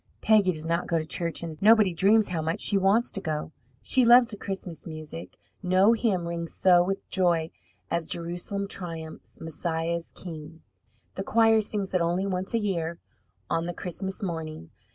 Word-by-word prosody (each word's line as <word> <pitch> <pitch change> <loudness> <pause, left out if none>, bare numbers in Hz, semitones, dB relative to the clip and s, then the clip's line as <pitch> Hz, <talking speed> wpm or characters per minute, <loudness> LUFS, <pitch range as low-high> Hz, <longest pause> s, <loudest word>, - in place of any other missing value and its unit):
Peggy 210 -4 +4
does 155 -2 -5
not 170 +1 -1
go 170 - +1
to 160 - -2
church, 170 +1 -3
and 160 -2 -7
nobody 215 -3 +5
dreams 205 +5 +3
how 170 -3 -2
much 160 +2 -2
she 205 - +1
wants 200 +5 +3
to 195 - -3
go. 155 -3 -3 0.3
She 260 - +3
loves 240 0 +7
the 210 - -5
Christmas 190 -5 -5
music. 155 - -8 0.2
No 190 +4 +4
hymn 200 -7 0
rings 170 -1 -4
so 180 -2 +5
with 195 +2 -3
joy 170 -4 +1 0.4
as: 170 -1 -1
Jerusalem 175 +4 -3
triumphs, 165 -5 -6
Messiah 165 +1 -2
is 170 - -9
king. 160 -2 -9 0.5
The 195 - -4
choir 225 +1 +4
sings 205 -2 -2
it 185 - +2
only 175 +3 0
once 190 +2 -2
a - - +4
year, 170 -6 -2 0.5
on 165 +1 -1
the 175 - -4
Christmas 190 +2 -5
morning. 160 - -5
175 Hz, 175 wpm, -27 LUFS, 165-200 Hz, 0.5 s, loves